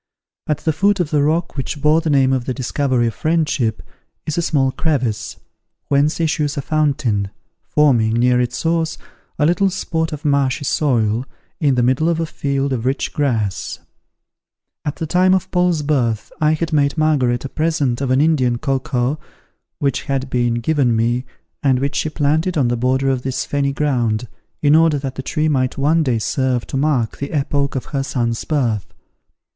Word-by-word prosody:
At 150 - +1
the 160 - 0
foot 200 +5 +2
of 170 -4 -1
the 150 -2 +2
rock 165 +4 0
which 145 +2 -4
bore 150 +3 +3
the 160 - -2
name 135 -2 +3
of 130 -2 -1
The 130 - -2
Discovery 130 -1 0
of 115 - -1
Friendship, 155 -8 0 0.4
is 155 - -2
a 170 - +1
small 135 -5 +1
crevice, 130 -8 -2 0.5
whence 145 +3 +2
issues 150 -3 0
a 140 - -2
fountain, 140 -11 0 0.3
forming, 120 -7 +2
near 125 +1 +3
its 120 -1 -2
source, 165 +1 0 0.4
a 150 - +2
little 185 +4 +3
spot 160 -3 -2
of 150 0 -7
marshy 140 -1 +1
soil 120 -6 +1 0.4
in 140 -4 +2
the 125 - +2
middle 130 +7 +2
of 165 -1 0
a 165 - 0
field 140 -3 -2
of 120 -3 -2
rich 135 +2 -1
grass. 115 -9 -1 1.1
At 145 - -3
the 160 - -4
time 185 +3 +3
of 190 - -3
Paul's 180 -4 +1
birth 125 -7 0
I 155 0 +4
had 160 0 -2
made 145 0 +2
Margaret 135 -6 +1
a - - -4
present 145 -6 0
of 135 - -1
an 130 +2 +3
Indian 135 -6 +2
cocoa 135 0 -1 0.6
which 140 -3 -1
had 135 -2 -2
been 120 -1 +1
given 125 -1 +1
me, 120 +3 0 0.4
and 135 -3 +3
which 140 +2 -1
she 155 - 0
planted 155 +4 0
on 130 -5 +2
the 120 - +1
border 130 +3 +1
of 130 -2 -1
this 130 0 -2
fenny 140 -1 0
ground, 125 -6 0 0.4
in 145 +1 +5
order 160 -2 +4
that 135 -2 -4
the 135 - -5
tree 155 +4 -1
might 130 -4 0
one 155 +4 +3
day 130 -6 +1
serve 125 +2 -1
to - - -7
mark 135 -5 0
the 140 - -4
epoch 140 -1 -1
of 130 - -3
her 140 - +1
son's 120 -4 -2
birth. 120 - -1
140 Hz, 185 wpm, -19 LUFS, 125-155 Hz, 1.1 s, in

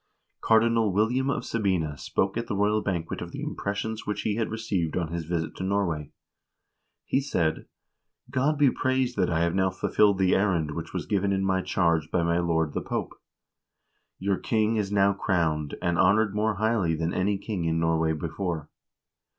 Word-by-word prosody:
x - - -8
Cardinal 115 -1 +4
William 120 +7 +1
of - - -1
Sabina 95 -9 0
spoke 95 +7 -1
at 115 0 -3
the 105 - -2
royal 105 +2 +2
banquet 85 -5 -3
of - - -6
the - - -6
impressions 105 +2 -3
which 105 0 -3
he 110 - 0
had 110 +1 -1
received 100 -8 -2
on 85 -3 -1
his 85 -1 -4
visit 80 -1 -3
to - - -5
Norway. 95 -7 -1 1.0
He 135 - +1
said: 85 - -1 0.6
"God 140 +3 +1
be 140 -3 +5
praised 130 -1 0
that 90 -3 +2
I 80 -1 +1
have 85 0 +1
now 95 0 +2
fulfilled 100 +2 +2
the 95 -1 +3
errand 90 -6 +1
which 80 +2 -6
was - - -4
given 100 -1 0
in 95 0 0
my 95 -1 +1
charge 85 -5 +1
by 85 - +1
my 85 +1 +1
lord 80 -3 0
the - - -2
Pope. - - -3 1.0
Your 95 -1 -1
king 110 0 +1
is 105 -2 -1
now 100 -1 +4
crowned, 80 -7 0
and 85 -1 +1
honored 100 +3 +4
more 105 +1 0
highly 105 -5 +1
than 80 +2 -2
any 100 +2 +1
king 95 -4 -4
in 80 0 +1
Norway 80 -1 +1
before. 80 0 -4
95 Hz, 185 wpm, -26 LUFS, 85-110 Hz, 1.0 s, be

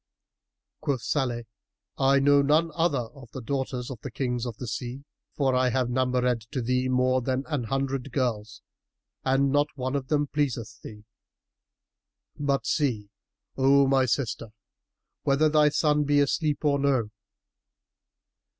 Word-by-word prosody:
[FN#319] - - -62
Quoth 140 -5 -1
Salih, 125 -4 -1 0.6
"I 135 +1 +4
know 140 +1 +5
none 155 +4 +2
other 165 -7 +1
of 130 -5 -14
the - - -5
daughters 130 -1 -3
of 120 -5 -8
the 140 - -6
Kings 125 0 -2
of 115 -2 -6
the 125 - -6
sea, 125 +4 -5 0.3
for 135 -3 +1
I 125 0 +3
have 125 0 0
numbered 125 -1 +1
to 130 - -3
thee 125 +2 0
more 130 0 +2
than 130 +2 -1
an 145 -6 -2
hundred 135 +1 -2
girls 110 -5 -2 0.6
and 135 +1 +2
not 145 +1 +3
one 130 0 -3
of 135 -2 -2
them 145 0 +1
pleaseth 125 -7 -3
thee: 105 -1 -11 1.3
but 140 -1 -1
see, 115 -9 -1 0.4
O 135 +1 +4
my 135 -1 +3
sister, 115 -2 -1 0.7
whether 145 +3 +3
thy 150 0 +4
son 150 0 +2
be 145 0 +2
asleep 150 +2 0
or 140 -1 +3
no." 130 -6 +1
135 Hz, 150 wpm, -26 LUFS, 125-140 Hz, 1.3 s, know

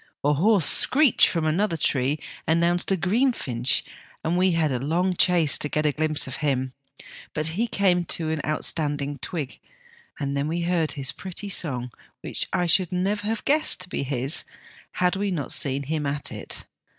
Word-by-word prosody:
A 145 +1 +3
hoarse 190 +3 +4
screech 280 - +6
from 165 -3 -1
another 170 +3 +1
tree 140 -1 +1 0.3
announced 170 +3 +2
a 195 - +2
green 225 +10 +2
finch, 125 - -1 0.4
and 165 +2 0
we 185 0 +3
had 160 -3 +1
a 125 - -1
long 175 +7 0
chase 170 -4 +4
to 150 - -2
get 150 +1 -1
a 150 - +3
glimpse 155 0 +1
of 130 - -5
him; 130 -3 -1 0.6
but 155 +1 +2
he 215 +9 -1
came 185 -5 +1
to 160 -1 -2
an 160 -2 -2
outstanding 145 -2 -2
twig, 150 -2 -4 0.6
and 140 -1 -2
then 140 +1 -1
we 170 +2 -2
heard 170 -2 0
his 140 -2 -2
pretty 195 +2 -7
song, 125 -10 -2 0.3
which - - -3
I 180 - +1
should 175 +1 +2
never 200 +3 -1
have 225 0 -3
guessed 305 -7 +2
to 180 - -9
be - - -3
his 135 +1 -1 0.5
had 180 +1 +1
we 200 +1 -1
not 160 -7 -2
seen 140 0 +1
him 150 +1 -2
at 145 0 -2
it. - - -5
160 Hz, 185 wpm, -24 LUFS, 145-180 Hz, 0.6 s, screech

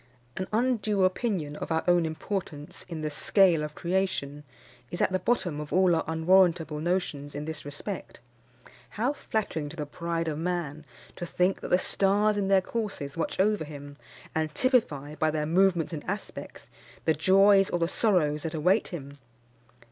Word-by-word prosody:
An 185 - -3
undue 215 -4 +1
opinion 185 -6 0
of - - -5
our 160 0 +1
own 175 -2 +4
importance 160 -2 -5
in 160 -2 -5
the 155 - -2
scale 175 +1 +3
of 150 0 -5
creation 170 -6 -1 0.5
is 175 - -5
at - - +2
the 185 - +1
bottom 180 -11 0
of 150 - -8
all 185 -1 +4
our 160 - 0
unwarrantable 160 -1 +3
notions 155 -4 -2
in 145 +1 -4
this 160 -1 -6
respect. 150 +7 -7 0.8
How 245 +7 +1
flattering 195 - -3
to 155 - -10
the 150 -3 -4
pride 165 +2 -3
of 155 -1 -2
man 165 -3 -3 0.3
to 175 - -5
think 180 +3 +1
that - - -5
the 180 - +5
stars 205 +3 +2
in 200 -1 0
their 195 -1 +5
courses 200 -11 -4
watch 165 - -3
over 205 -2 +2
him, 145 -1 -9 0.4
and 155 -1 -1
typify, 155 - +1
by 155 +1 +1
their 155 -1 -1
movements 175 0 +2
and 150 - -5
aspects, 200 +2 -6 0.4
the 160 - +4
joys 195 +4 +5
or - - 0
the 170 -1 +1
sorrows 170 -7 +1
that 160 +1 -4
await 180 +7 +2
him! 140 -4 -8
170 Hz, 170 wpm, -28 LUFS, 150-195 Hz, 0.8 s, the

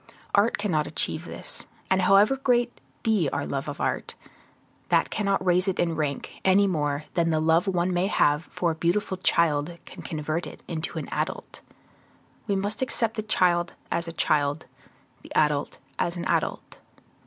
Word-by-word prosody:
Art 205 +3 +4
cannot 170 -8 0
achieve - - -2
this; - - -7 0.2
and 190 0 +2
however 195 +7 +5
great 245 -2 +1 0.2
be 210 - +2
our 145 - -2
love 135 +1 -3
of 145 - -6
art, - - -2 0.7
that - - +3
cannot 195 -3 0
raise 180 +1 +3
it 190 - 0
in 170 -2 +1
rank, 145 -3 -3
any 190 +2 +5
more 150 -5 0
than 170 -1 +2
the 160 -1 +2
love 160 +5 +3
one 180 -1 +1
may 180 +2 +1
have 150 -4 +2
for 170 -2 -1
a - - -1
beautiful 175 +4 0
child 170 -2 +1
can 185 - -10
convert 155 +1 -3
it - - -11
into 160 -1 -4
an - - -4
adult. - - -4 0.9
We 200 - +1
must 205 +4 -2
accept 235 -3 0
the 215 - -1
child 175 -5 +2 0.2
as 170 0 -1
a 165 - -5
child, 145 -1 +1 0.6
the - - -14
adult 150 -2 +1 0.2
as 170 +1 0
an 170 - -4
adult. - - -1
175 Hz, 170 wpm, -26 LUFS, 155-200 Hz, 0.9 s, however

